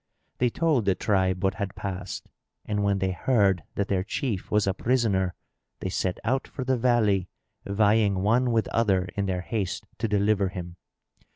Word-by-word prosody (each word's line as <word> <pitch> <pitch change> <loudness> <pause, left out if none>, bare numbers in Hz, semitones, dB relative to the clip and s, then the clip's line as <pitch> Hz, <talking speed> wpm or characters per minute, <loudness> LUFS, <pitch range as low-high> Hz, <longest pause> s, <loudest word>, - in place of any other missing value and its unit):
They 125 - +3
told 150 -4 +1
the 95 -2 +3
tribe 95 -3 +1
what 95 0 +2
had 100 -1 -4
passed; 95 -1 -5 0.3
and, 105 -1 -1
when 100 -1 +2
they 95 -1 0
heard 100 -3 +2
that 100 - 0
their 95 -2 0
chief 110 -1 -3
was 105 -1 +2
a 95 - +1
prisoner, 100 -6 +1 0.4
they 95 - -3
set 95 -1 -1
out 130 +5 0
for 130 - -5
the 130 +1 +1
valley 110 -7 +2 0.4
vying 100 -1 +3
one 120 +4 +3
with 115 -2 +1
other 95 -5 +1
in 100 -1 -1
their 90 -1 -1
haste 100 0 -3
to - - 0
deliver 100 -1 +2
him. 90 -1 -7
100 Hz, 175 wpm, -26 LUFS, 95-115 Hz, 0.4 s, They